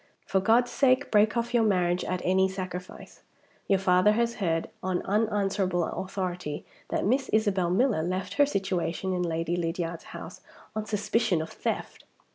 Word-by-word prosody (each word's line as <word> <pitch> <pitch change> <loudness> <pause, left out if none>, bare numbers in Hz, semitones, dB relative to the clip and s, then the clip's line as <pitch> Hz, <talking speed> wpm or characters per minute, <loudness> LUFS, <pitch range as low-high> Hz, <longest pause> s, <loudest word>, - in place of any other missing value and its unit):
For 190 - +1
God's 235 +5 +3
sake, 260 +1 +2
break 215 +2 +4
off 235 +1 -1
your 240 - +4
marriage 180 -4 +2
at 185 -1 -3
any 190 +1 +3
sacrifice. 185 -1 -7 0.5
Your 195 - +4
father 185 +2 +4
has 235 +1 0
heard, 165 -5 0
on 185 -1 -1
unanswerable 195 -3 +1
authority, 180 -5 -4 0.2
that - - -1
Miss 260 +6 +1
Isabel 200 -5 +2
Miller 210 -1 +2
left 185 +3 -3
her - - +7
situation 190 - -1
in 180 - -1
Lady 165 0 -1
Lydiard's 165 -1 -3
house - - -9 0.3
on 215 0 -3
suspicion 210 -3 +1
of 160 +1 -5
theft." - - -4
190 Hz, 155 wpm, -27 LUFS, 180-215 Hz, 0.5 s, her